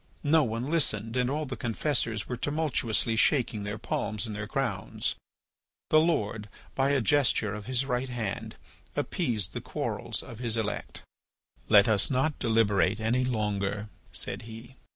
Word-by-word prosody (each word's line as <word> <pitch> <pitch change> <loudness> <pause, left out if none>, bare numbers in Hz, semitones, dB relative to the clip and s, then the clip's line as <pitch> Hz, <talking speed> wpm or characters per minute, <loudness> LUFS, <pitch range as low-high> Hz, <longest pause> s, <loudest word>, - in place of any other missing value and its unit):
No 155 +1 +5
one 120 +3 -2
listened, 115 -8 0
and 125 -1 +2
all 150 +3 -1
the 130 -1 -4
confessors 115 -3 0
were 125 - -2
tumultuously 125 -5 0
shaking 115 -3 +2
their 105 +1 -4
palms 105 0 -2
and 110 -2 -5
their 105 0 -4
crowns. - - -1 0.8
The 155 - +7
Lord, 110 -10 0 0.2
by 135 0 +2
a 140 -2 +3
gesture 115 -4 +3
of 105 0 -7
his 130 +1 +1
right 130 0 -1
hand, 115 -5 -4 0.4
appeased 105 -7 -1
the - - -4
quarrels - - -3
of 115 - -10
his 115 -2 +1
elect. 110 -2 -3 0.7
"Let 100 -1 +7
us 110 -3 +4
not 140 +3 +1
deliberate 110 -3 +2
any 120 +3 +1
longer," 105 -3 -1 0.2
said 95 +3 -3
he. 115 +4 -10
115 Hz, 150 wpm, -29 LUFS, 105-130 Hz, 0.8 s, The